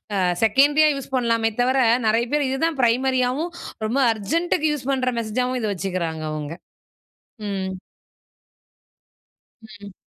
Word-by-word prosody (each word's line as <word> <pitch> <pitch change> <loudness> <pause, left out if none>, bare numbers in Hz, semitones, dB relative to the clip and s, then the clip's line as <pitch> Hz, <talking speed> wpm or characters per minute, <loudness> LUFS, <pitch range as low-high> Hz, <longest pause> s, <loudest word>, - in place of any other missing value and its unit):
அ - - 0 0.3
செகண்டரியா 290 +7 +5
use 275 -1 -8
பண்ணலாமே 230 -2 +1
தவர, 260 +2 +2 0.3
நெறைய 225 +2 +2
பேர் 295 -2 +2
இதுதான் 285 +3 -1
பிரைமரியாவும், 255 +5 +1 0.3
ரொம்ப 235 +6 0
அர்ஜென்ட்டு 275 - -1
க்கு 310 +1 +1
யூஸ் 275 -2 -5
பண்ற 255 -2 0
மெசேஜாவும் 250 +3 -1
இத 220 - -1
வச்சுக்கிறாங்க 175 -4 -3
அவுங்க 155 0 -5 1.0
ம். 190 -1 -3 1.9
ம். 205 -2 -12
245 Hz, 120 wpm, -22 LUFS, 205-270 Hz, 1.9 s, செகண்டரியா